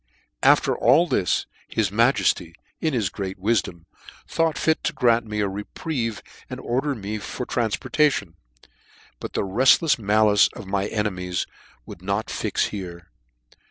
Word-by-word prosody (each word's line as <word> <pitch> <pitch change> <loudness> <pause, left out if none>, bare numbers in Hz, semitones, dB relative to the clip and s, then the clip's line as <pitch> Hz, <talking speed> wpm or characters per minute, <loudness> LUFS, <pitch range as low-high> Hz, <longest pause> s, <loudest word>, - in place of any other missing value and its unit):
After - - +4
all 145 +8 +4
this, 95 - 0 0.2
his 105 -4 -1
Majefty, 100 -7 +2 0.2
in 160 - 0
his 105 -7 0
great 95 0 -5
wifdom, 95 -4 -1 0.4
thought 165 -3 0
fit 160 0 +1
to - - 0
grant 120 -2 +2
me 105 0 -2
a 100 - +1
reprieve, 115 - -4 0.3
and - - -6
ordered 135 +4 -1
me 105 +1 -4
for 125 - -5
tranfportation; 120 - 0 0.9
but - - -7
the - - 0
refllefs 130 - +4
malice 105 -1 +4
of - - -8
my 100 +1 -1
enemies 90 -5 -2 0.4
would - - -11
not 100 +3 -2
fix - - -1
here. 85 -4 -8
105 Hz, 140 wpm, -23 LUFS, 95-120 Hz, 0.9 s, After